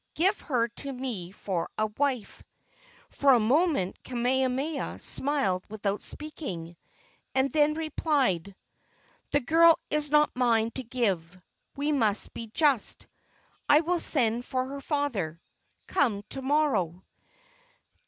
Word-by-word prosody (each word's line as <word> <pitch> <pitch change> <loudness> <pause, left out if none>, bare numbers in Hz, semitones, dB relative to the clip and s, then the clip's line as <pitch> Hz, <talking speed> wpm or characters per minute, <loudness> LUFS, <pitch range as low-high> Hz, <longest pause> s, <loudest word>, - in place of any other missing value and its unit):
Give 380 +5 +2
her 240 -5 0
to 275 +4 -7
me 245 -9 -5
for 190 -3 -3
a 215 - +2
wife." 245 0 -2 0.7
For 280 -1 +4
a 245 - +5
moment 260 - +1
Kamehameha 260 +4 -1
smiled 265 -11 0
without 205 -1 -2
speaking, 185 - -6 0.6
and 265 0 +2
then 305 0 +3
replied: 275 - 0 0.7
"The 290 - +1
girl 330 +5 +6
is 300 -1 +2
not 300 +1 +3
mine 230 -3 +2
to 260 - -5
give. 190 -8 -2 0.4
We 290 +2 -1
must 220 -8 +1
be 230 - -7
just. 275 0 +1 0.6
I 295 +1 +7
will 345 +1 0
send 240 -7 +2
for 255 0 -2
her 280 0 -6
father. 240 - -2 0.5
Come 215 -8 +1
to 270 - -5
morrow." 265 - +1
255 Hz, 125 wpm, -28 LUFS, 210-295 Hz, 0.7 s, I